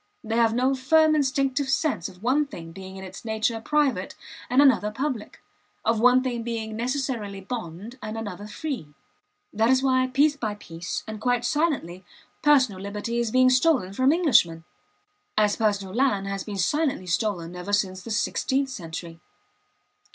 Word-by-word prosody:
They 225 0 -2
have 230 -1 +3
no 255 +2 +2
firm 310 +4 +4
instinctive 275 -1 +1
sense 265 - 0
of 185 +1 -16
one 280 +5 +2
thing 165 -10 -9
being 190 +2 -9
in 190 - -8
its 190 0 -9
nature 220 0 -1
private 295 +1 0 0.3
and 250 - +3
another 260 -7 +5
public, 250 -1 -4 0.5
of 225 -1 +2
one 250 +2 +5
thing 245 -3 -2
being 225 -2 -4
necessarily 235 -4 -2
bond 210 +2 -7
and 215 +1 -5
another 205 -2 -6
free. 215 - -5 0.6
That 220 +2 +2
is 260 0 +3
why 255 -1 +3
piece 285 +3 +3
by 215 -7 -3
piece, 170 -3 -6
and 215 -1 -7
quite 245 0 +1
silently, 265 - -1 0.4
personal 260 -10 +3
liberty 210 +4 -3
is 235 -1 0
being 255 +2 +4
stolen 255 - +2
from 260 +6 +3
Englishmen, 245 - +3 0.7
as 210 -1 +3
personal 200 -4 0
land 225 -5 +1
has 195 -1 -3
been 205 -2 -6
silently 270 - 0
stolen 180 -2 -1
ever 180 +3 -6
since 190 -2 0
the 230 - -9
sixteenth 265 +5 0
century. 165 -6 -7
225 Hz, 160 wpm, -25 LUFS, 195-265 Hz, 0.7 s, another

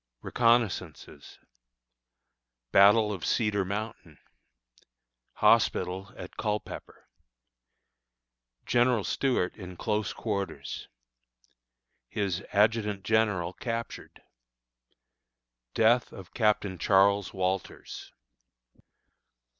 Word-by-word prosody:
Reconnoissances. 120 -3 0 1.3
Battle 105 +2 +6
of 90 -6 -7
Cedar 105 -3 +1
Mountain. 100 -5 -6 1.2
Hospital 95 +2 +2
at - - -10
Culpepper. 105 0 -5 1.6
General 120 -2 +2
Stuart 125 -9 0
in 90 -3 -9
Close 105 +1 -1
Quarters. 100 -4 -4 1.2
His 100 -5 -2
Adjutant 105 -1 +1
General 100 -4 +1
Captured. 115 +1 -6 1.5
Death 115 +2 +3
of 95 -3 -12
Captain 105 -4 +1
Charles 100 0 +3
Walters. 95 0 -4
105 Hz, 65 wpm, -28 LUFS, 95-110 Hz, 1.6 s, Battle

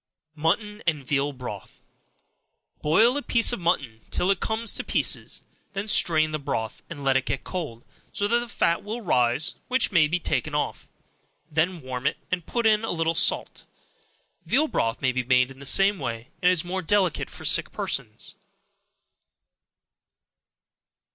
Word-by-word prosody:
Mutton 210 +8 -1
and 150 -5 0
Veal 140 +1 0
Broth. 125 -7 -9 1.0
Boil 220 - +4
a - - -1
piece 235 -3 +3
of 240 - -2
mutton 135 -10 -1
till 185 - +1
it 195 - 0
comes 225 0 -2
to - - -3
pieces; - - -1 0.3
then 200 +2 -3
strain 155 -6 +5
the 155 - -2
broth, 110 -5 -4
and 150 -4 -8
let 135 -1 +2
it 135 -1 +1
get 135 - -2
cold, 150 -11 -6 0.3
so 205 - -1
that 235 +3 +3
the 240 - -5
fat 170 -5 0
will 220 +4 -5
rise, 125 +1 +2
which 255 -2 +2
must 155 -5 +4
be 175 - +1
taken 150 -1 -1
off; 150 - -2 0.6
then 160 +1 0
warm 130 +1 -3
it, - - -1
and 180 -3 -2
put 235 -1 -1
in 215 0 +4
a 225 - -3
little 165 -1 0
salt. 165 - 0 0.8
Veal 305 +3 +2
broth 115 - -1
may 130 - +3
be 130 0 -1
made 125 +1 +3
in 135 - -14
the 140 - -4
same 195 +4 +4
way, 115 0 -5
and 180 - +5
is 180 -2 -1
more 190 +2 -3
delicate 185 -1 +1
for - - -10
sick - - +3
persons. - - -4
165 Hz, 165 wpm, -25 LUFS, 135-200 Hz, 1.0 s, strain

